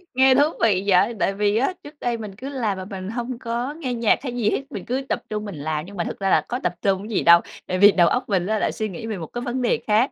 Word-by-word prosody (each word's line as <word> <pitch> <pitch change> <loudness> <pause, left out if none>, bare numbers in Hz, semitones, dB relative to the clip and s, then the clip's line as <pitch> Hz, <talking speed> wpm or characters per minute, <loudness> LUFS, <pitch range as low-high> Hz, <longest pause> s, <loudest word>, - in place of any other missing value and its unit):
Nghe 260 0 +6
thú 280 - +5 0.2
vị 195 -4 +3
vậy! 200 +4 +4
Tại 195 - +1
vì 205 +1 +1
á, 275 +10 +1
trước 290 0 -13
đây 240 -1 -1
mình 210 -3 -8
cứ 265 +6 -7
làm 225 -8 -2
mà 185 - -6
mình 190 -1 -6
hông 240 +1 -4
có 240 +3 -3
nghe 290 -6 -4
nhạc 230 -2 +2
hay 245 -3 -4
gì 220 -3 +1
hết, - - 0
mình 195 - -6
cứ 255 +3 -1
tập - - -1
trung 210 0 -3
mình 200 -5 -6
làm 150 +2 -3
nhưng 200 0 -11
mà 170 - 0
thực - - -6
ra 195 - 0
là - - +4
có 245 - -2
tập 180 - 0
trung 195 +1 0
cái 220 - -1
gì - - +1
đâu, 170 0 +8 0.3
tại 185 - -1
vì 205 +1 +8
đầu 175 -3 +4
óc 250 +5 -1
mình 190 -2 +1
á 215 0 0
lại - - 0
suy 215 -2 -3
nghĩ 190 +5 -7
về 215 -3 -3
một 160 -3 -6
cái 240 - -6
vấn 250 +1 -3
đề 235 -1 +1
khác. 220 +5 +3
215 Hz, 315 wpm, -23 LUFS, 195-245 Hz, 0.3 s, đâu